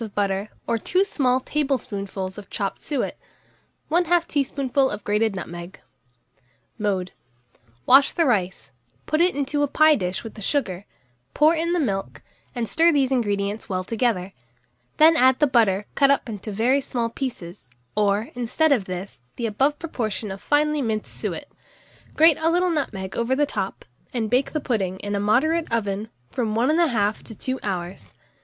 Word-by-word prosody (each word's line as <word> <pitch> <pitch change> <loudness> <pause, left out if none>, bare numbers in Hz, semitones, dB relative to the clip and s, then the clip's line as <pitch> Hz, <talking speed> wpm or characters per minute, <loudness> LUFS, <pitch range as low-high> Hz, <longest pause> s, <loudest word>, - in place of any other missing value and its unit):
of 215 -3 -8
butter 200 0 -1 0.2
or 230 -1 0
2 365 - +2
small 260 -9 +1
tablespoonfuls 200 -10 -3
of 205 - -13
chopped 195 -3 -3
suet, 285 -5 -3 0.7
1/2 345 0 +3
teaspoonful 275 -2 0
of 210 0 -5
grated 210 0 +1
nutmeg. 175 0 -7 1.0
Mode. 190 -3 -1 0.7
Wash 270 +2 +6
the 335 - +1
rice, 190 - -1 0.3
put 310 +2 +1
it 360 +1 +3
into 285 +1 -1
a 290 - +3
pie 310 +2 +5
dish 180 -4 -3
with 225 - -8
the 215 - -11
sugar, 200 -6 -1 0.5
pour 305 +2 +5
in 335 +1 0
the 355 - +1
milk, 195 -10 -3 0.3
and 235 -2 -2
stir 330 +6 +4
these 275 -4 +2
ingredients 205 -4 -1
well 185 -1 -1
together; 205 -3 -1 0.6
then 320 +2 +7
add 260 -3 +5
the 295 - +4
butter 215 -7 +2
cut 275 - +4
up 280 -1 +2
into 215 -1 -6
very 245 +7 +2
small 240 -3 -2
pieces, 180 - -6 0.3
or, 210 +1 +1
instead 250 +6 +1
of 240 -9 +2
this, 185 -5 -7
the 235 - -3
above 270 +7 +1
proportion 220 - -4
of 195 - -7
finely 300 0 +2
minced 220 -4 -3
suet; - - -4 0.7
grate 320 -1 +6
a 320 +1 +2
little 355 +1 +2
nutmeg 195 - -3
over 235 +3 +1
the 295 +2 +2
top, 195 -8 -4 0.3
and 225 -3 -1
bake 260 +2 +2
the 305 - -1
pudding, 200 -9 -1
in 205 0 -4
a 200 - 0
moderate 310 +11 +2
oven, 210 -1 -1 0.2
from 220 -4 -1
1 240 +4 +2
1/2 240 -11 +2
to 225 - -11
2 260 +5 -3
hours. 175 - -5
230 Hz, 165 wpm, -23 LUFS, 200-285 Hz, 1.0 s, then